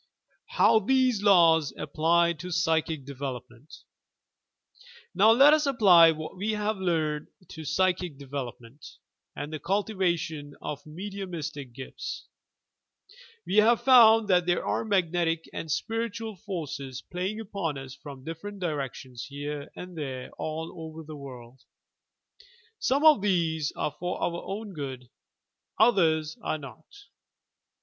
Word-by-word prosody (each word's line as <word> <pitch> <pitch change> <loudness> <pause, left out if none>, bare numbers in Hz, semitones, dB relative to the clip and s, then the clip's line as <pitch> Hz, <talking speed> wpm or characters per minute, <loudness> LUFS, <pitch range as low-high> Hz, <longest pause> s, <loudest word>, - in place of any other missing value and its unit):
HOW 220 - +4
TUVSS 255 0 +2
LAWS 170 -6 +5
APPLY 165 +3 +2
TO 175 +3 -8
PSYCHIC 160 -3 0
DEVELOPMENT 135 -1 -8 1.3
Now 215 - +5
let 275 +6 +7
US 305 -1 +2
apply 190 -11 +7
what 155 +3 -4
we 205 +4 -2
have 210 0 -1
learned 160 -5 -1 0.2
to 160 - -8
psychic 180 -1 0
development, 130 -2 -8 0.5
and 145 +2 -6
the 155 - -4
cultivation 170 -6 -1
of 145 -1 -6
mediumistic 170 -6 -6
gifts. 130 +1 -7 1.2
We 200 - -1
have 225 +2 +5
found 225 -4 +7
that 180 -1 +3
there 175 - +1
are - - 0
magnetic 175 -5 0
and 160 - -5
spiritual 225 +4 -3
forces 145 -9 -6
playing 185 +5 -4
upon 195 -9 -3
us 135 -1 -8
from 135 -1 -11
different 165 +7 -7
directions 135 -6 -4
here 145 +1 -6
and 180 0 -9
there 130 -5 -5
all 160 +1 -4
over 160 0 -8
the 155 0 -9
world. 130 -3 -11 1.2
Some 280 +4 +1
of 305 -10 +7
these 165 -6 0
are - - -2
for 175 +5 -4
our 170 0 -2
own 205 +1 -6
good, 130 -5 -7 0.7
others 160 -9 +3
are - - -2
not. 145 +2 -12
165 Hz, 125 wpm, -27 LUFS, 145-200 Hz, 1.3 s, let